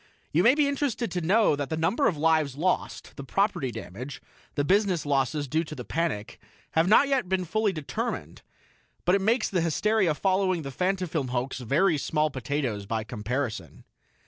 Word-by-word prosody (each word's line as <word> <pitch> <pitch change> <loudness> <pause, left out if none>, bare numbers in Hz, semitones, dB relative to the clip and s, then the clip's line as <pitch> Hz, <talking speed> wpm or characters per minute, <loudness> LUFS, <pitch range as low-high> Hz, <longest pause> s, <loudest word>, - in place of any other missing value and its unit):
You 165 - +3
may 235 +8 +5
be 295 -1 +3
interested 280 -4 -1
to 180 - -2
know 195 +1 +3
that 145 -1 -4
the 160 - -2
number 190 - +2
of 165 - 0
lives 155 -3 +2
lost, 175 +6 -2
the 140 - -6
property 195 -3 0
damage, 125 +5 -7 0.4
the 145 - +1
business 190 0 +2
losses 145 +1 0
due 160 +5 0
to 155 - -8
the 125 -4 -7
panic, 160 -11 -2 0.3
have 160 +2 +2
not 220 +8 +6
yet 265 -9 0
been 190 -1 0
fully 215 +4 +1
determined; 155 -6 -4 0.6
but 180 - +3
it 200 - +3
makes 225 +4 +2
the 185 -3 0
hysteria 180 +1 +2
following 185 -1 +1
the 135 - -5
Fantafilm 180 -2 -1
hoax 125 +2 -2
very 150 - +2
small 155 +1 0
potatoes 125 -6 -3
by 110 0 -1
comparison. 120 +2 -4
160 Hz, 175 wpm, -27 LUFS, 140-195 Hz, 0.6 s, not